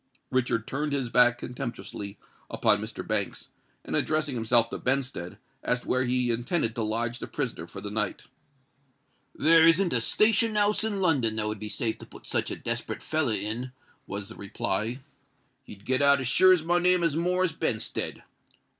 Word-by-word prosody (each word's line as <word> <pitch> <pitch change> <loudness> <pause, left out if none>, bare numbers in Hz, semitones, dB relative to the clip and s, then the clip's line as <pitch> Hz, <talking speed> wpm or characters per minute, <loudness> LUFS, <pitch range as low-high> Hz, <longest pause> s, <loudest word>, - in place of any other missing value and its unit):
Richard 120 -3 0
turned 145 +3 -2
his 135 -4 -1
back 120 0 +5
contemptuously 120 -5 -6 0.3
upon - - +2
Mr. - - -6
Banks, - - -2 0.4
and, - - -3
addressing 155 -2 +1
himself 115 0 +3
to - - -4
Benstead, 125 -9 -2 0.3
asked 125 0 0
where 130 +1 +1
he 125 -1 +1
intended 120 +1 0
to 115 - -3
lodge 115 +2 -2
the - - -6
prisoner 120 - -4
for - - -9
the 105 - -6
night. 105 -2 -1 1.1
"There 165 0 +6
isn't 170 +2 +4
a 120 - +1
station 220 - +3
house 210 +1 +2
in 205 -3 -1
London 135 -11 +2
that 110 -1 -1
would 105 -1 -4
be 105 0 -6
safe 115 -1 -2
to - - -11
put - - -14
such - - -1
a - - -3
desperate - - -3
feller 150 -8 0
in," 115 +6 -4 0.3
was 100 0 -5
the - - -10
reply. 110 +5 -3 0.6
"He'd 100 0 -13
get 130 +1 +2
out 140 0 +6
as 130 - -2
sure 185 +9 +6
as 180 -4 +4
my 175 +2 +2
name 180 0 +3
is 165 -3 +1
Morris 180 +1 +1
Benstead. 110 -3 -3
125 Hz, 180 wpm, -27 LUFS, 115-160 Hz, 1.1 s, There